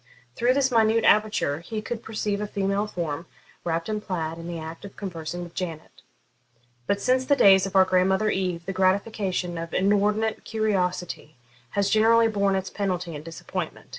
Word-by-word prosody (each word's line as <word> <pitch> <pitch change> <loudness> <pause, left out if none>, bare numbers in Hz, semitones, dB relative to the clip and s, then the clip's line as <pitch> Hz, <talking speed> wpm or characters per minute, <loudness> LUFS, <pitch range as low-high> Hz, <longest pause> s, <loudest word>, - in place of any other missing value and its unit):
Through 245 +2 +2
this 275 -1 +2
minute 225 -1 +3
aperture 210 -9 +3
he 215 +6 -5
could 225 +1 -5
perceive 210 -2 -2
a 210 - -2
female 200 +1 -1
form, 165 -4 -4 0.4
wrapped 165 -1 -2
in 215 -1 -1
a - - -6
plaid, 165 -5 -3
in 165 - -7
the 170 -1 -4
act 160 +2 -8
of 200 - -10
conversing 175 -2 -5
with 170 -1 -10
Janet. 165 -4 -6 0.9
But, 200 - +1
since 255 +3 +2
the 285 - +4
days 195 -6 +6
of 195 - -9
our 190 0 +7
grandmother 190 +3 +2
Eve, 180 -3 -2
the 195 - -3
gratification 185 -2 0
of 165 0 -5
inordinate 210 +3 +1
curiosity 185 -7 -2 0.4
has 200 0 +2
generally 225 +1 +5
borne 200 -2 +1
its 190 0 -3
penalty 180 -4 -2
in 145 - -6
disappointment. 165 +1 -6
195 Hz, 175 wpm, -25 LUFS, 175-215 Hz, 0.9 s, our